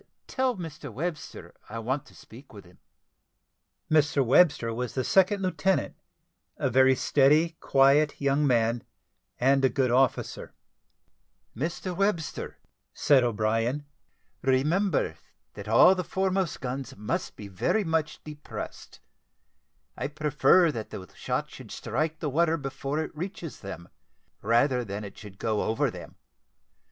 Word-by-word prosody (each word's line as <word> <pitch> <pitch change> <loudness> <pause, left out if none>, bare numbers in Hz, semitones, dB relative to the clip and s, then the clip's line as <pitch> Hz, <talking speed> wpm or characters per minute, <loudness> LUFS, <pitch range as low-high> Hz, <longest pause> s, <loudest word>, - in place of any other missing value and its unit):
Tell 260 -2 0
Mr 155 -5 -7
Webster 155 +6 -6 0.2
I 115 - -6
want 130 +6 -3
to - - -18
speak 125 +4 -15
with 100 -3 -12
him." 90 0 -20 1.1
Mr 145 -3 +3
Webster 135 -3 +4
was 125 +1 -4
the 130 - 0
second 195 - +3
lieutenant, 190 +1 0 0.6
a - - -1
very 130 +2 +5
steady, 150 +5 +3
quiet, 140 +2 +3
young 140 +1 +2
man, 115 -1 +1 0.6
and 135 +2 +3
a 130 - +5
good 130 -3 0
officer. 130 0 0 1.0
"Mr 170 - -3
Webster," 170 -8 -2 0.4
said 135 -3 +4
O'Brien, 115 +4 0 0.6
"remember 145 - +1 0.4
that - - -9
all 185 - +7
the 185 -1 -2
foremost 190 0 -1
guns 130 -1 -5
must 105 +1 -3
be 105 - -9
very 100 - 0
much 160 -3 -2
depressed. 150 -1 -9 0.9
I 135 - -3
prefer 150 +3 +3
that 110 -6 -6
the 95 -4 -8
shot - - -3
should - - -11
strike 155 +1 -2
the 155 - -3
water 165 +2 +2
before 135 0 -4
it 155 - -9
reaches 170 -1 -6
them, 95 -4 -8 0.5
rather 120 +4 +2
than 100 -1 -5
it 100 - -9
should 100 -3 -12
go 110 0 -1
over 110 - 0
them. - - -10
140 Hz, 135 wpm, -27 LUFS, 120-160 Hz, 1.1 s, all